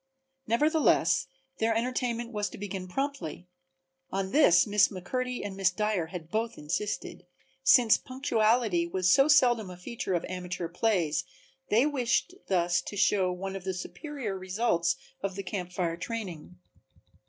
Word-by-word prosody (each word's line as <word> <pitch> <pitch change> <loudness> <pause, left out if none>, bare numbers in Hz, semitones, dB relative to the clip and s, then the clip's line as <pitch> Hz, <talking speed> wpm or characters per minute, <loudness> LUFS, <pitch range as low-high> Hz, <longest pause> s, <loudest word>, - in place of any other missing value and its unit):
Nevertheless 300 +4 +3 0.3
their 225 0 +2
entertainment 240 0 -1
was 210 -2 -2
to - - -10
begin 195 -2 -5
promptly 270 - -4 0.6
(on 190 0 -2
this 180 - +6
Miss 205 -1 +4
McMurtry 250 +6 -4
and 200 -1 -5
Miss 195 -1 +3
Dyer 205 -3 -1
had 165 -1 -8
both 225 +1 -1
insisted), 175 +3 -4 0.3
since 245 -4 +6
punctuality 225 -8 +1
was 185 +1 +1
so 270 +5 +6
seldom 245 -8 +4
a 180 - -9
feature 190 0 -3
of 170 - -1
amateur 180 -1 -4
plays 175 -3 0 0.5
they 230 +6 +4
wished 285 +4 0
thus 175 -2 +2
to 205 - -7
show 190 -1 +3
one 190 +2 -5
of 195 - -6
the 190 0 -3
superior 265 - -5
results 185 -2 0 0.3
of 195 -1 -3
the 195 - -4
Camp 180 -2 -4
Fire 175 -2 -2
training. 180 -5 -6
200 Hz, 145 wpm, -29 LUFS, 180-235 Hz, 0.6 s, this